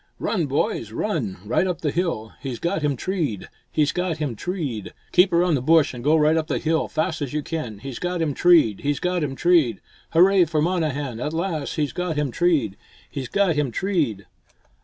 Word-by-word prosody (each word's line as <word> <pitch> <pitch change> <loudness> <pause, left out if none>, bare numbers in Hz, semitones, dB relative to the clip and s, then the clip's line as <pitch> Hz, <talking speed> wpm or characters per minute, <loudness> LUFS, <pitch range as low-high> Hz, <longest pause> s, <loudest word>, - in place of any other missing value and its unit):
"Run, 175 -8 -1
boys, 130 -5 -1
run! 120 - -2
right 120 - +1
up 180 -4 -3
the 150 - 0
hill! 165 -12 -2
He's 130 -4 -4
got 170 +4 -1
him 145 -2 +1
treed, 150 - -2 0.2
he's 150 -2 +2
got 180 -3 -2
him 145 -6 -3
treed! 130 - -4 0.2
Keep 180 +1 +5
around 175 0 +3
the 135 - +1
bush 160 +2 +4
and 120 -1 -8
go 150 +3 +4
right 155 0 +4
up 160 -1 0
the 150 - -1
hill, 160 0 0
fast 160 0 -2
as 140 -2 -3
you 150 -1 -1
can. 145 -11 -4
He's 125 +4 -7
got 180 0 -2
him 160 -3 0
treed, 155 - +4
he's 145 -1 -1
got 180 -2 0
him 135 -2 -3
treed! 160 - +3 0.3
Hurrah 185 +2 +5
for 155 -1 -1
Monnehan, 150 -7 -1
at 150 +5 -3
last! 165 -3 -2
He's 150 -3 -1
got 180 -3 -2
him 150 -3 -1
treed, 145 - +1 0.3
he's 135 -3 -4
got 200 -4 +2
him 150 -3 +1
treed!" 140 - -1
155 Hz, 200 wpm, -23 LUFS, 135-175 Hz, 0.3 s, Keep